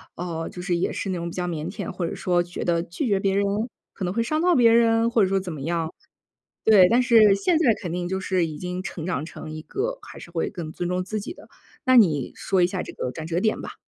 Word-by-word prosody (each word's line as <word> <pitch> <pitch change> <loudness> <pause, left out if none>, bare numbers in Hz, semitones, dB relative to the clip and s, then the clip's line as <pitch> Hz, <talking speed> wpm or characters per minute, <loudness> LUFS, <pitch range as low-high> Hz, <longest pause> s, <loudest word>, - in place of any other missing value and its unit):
呃， 165 -2 -4
就 180 - -8
是 180 -1 0
也 175 - 0
是 195 - -3
那 185 - -1
种 170 0 -4
比 - - -9
较 180 -1 -2
腼 165 0 -3
腆， 205 +1 -5
或 180 -2 -3
者 - - -5
说 175 -1 +1
觉 175 0 -6
得 170 -1 +1
拒 175 - -4
绝 200 -2 +2
别 195 0 +1
人 200 0 +2 0.5
可 190 - -4
能 180 - -2
会 230 - +1
伤 310 +6 -1
到 355 0 +4
别 235 -3 +6
人？ 230 0 +4
或 230 - +3
者 - - +3
说 195 0 +1
怎 185 -2 -6
么 150 -3 -7
样。 165 +1 -2 0.7
对， 195 -5 +7
但 245 +2 +4
是 225 -5 +6
现 320 - +2
在 245 -9 +4
肯 175 -3 -5
定 175 0 -2
就 190 0 -2
是 185 -3 +1
已 155 -2 -7
经 180 0 -4
成 165 -4 -6
长 155 -5 -2
成 155 - -9
一 155 0 -7
个 - - -3
还 - - -11
是 170 - -11
会 165 -1 -1
更 170 -6 -6
尊 175 - -3
重 180 0 -1
自 215 +2 -3
己 335 - -7
的， - - -16 0.4
那 255 -1 +5
你 155 - +4
说 190 -2 0
一 - - +5
下 185 0 -3
这 - - -9
个 125 - -4
转 160 -1 -6
折 170 +2 -1
点 215 0 +1
吧。 - - -8
185 Hz, 300 characters per minute, -24 LUFS, 170-220 Hz, 0.7 s, 对